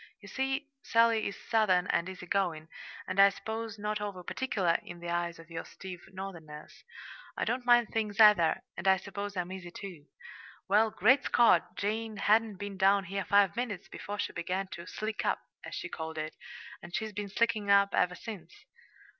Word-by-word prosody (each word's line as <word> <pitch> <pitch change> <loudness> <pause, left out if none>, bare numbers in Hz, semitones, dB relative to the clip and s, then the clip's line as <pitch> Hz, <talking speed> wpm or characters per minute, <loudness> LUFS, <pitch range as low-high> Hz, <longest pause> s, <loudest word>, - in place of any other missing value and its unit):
You 205 - -13
see, 270 +6 -2
Sally 230 -1 +3
is 200 - -5
Southern 195 -6 +2
and 175 0 0
easy 185 -1 -8
going, 170 -4 -1 0.4
and 185 - -2
I 200 0 +9
suppose 220 +2 -5
not 210 0 -2
over 200 -3 -5
particular 190 -8 0
in 175 -1 -9
the 170 0 -5
eyes 170 -1 -1
of 165 0 -15
you 165 0 -4
stiff 185 -2 -9
Northerners. 170 -6 -9 0.5
I - - 0
don't 245 +2 -2
mind 240 -2 +5
things, 215 -1 -2
either, 205 -7 +6
and - - -4
I 190 0 +6
suppose 200 +1 -6
I'm 180 0 -2
easy, 185 -2 -7
too. 175 -5 -9 0.6
Well, 210 +3 +4
great 245 +7 +4
Scott! 240 - +4
Jane 215 +1 -2
hadn't 215 +1 +3
been 200 0 -6
down 195 +1 +4
here 195 +1 -4
five 200 -1 +4
minutes 215 -6 -3
before 205 +1 -6
she - - -3
began 185 +3 -3
to 170 -1 -8
"slick 215 +2 -4
up," - - +1 0.3
as - - -7
she 360 - -4
called 160 - -6
it 155 0 -4 0.5
and 175 - -7
she's 220 -1 -3
been 205 -1 -4
"slickin' 220 -1 0
up" 200 0 +5
ever 180 0 +2
since. 190 -8 -9
200 Hz, 185 wpm, -30 LUFS, 180-215 Hz, 0.6 s, I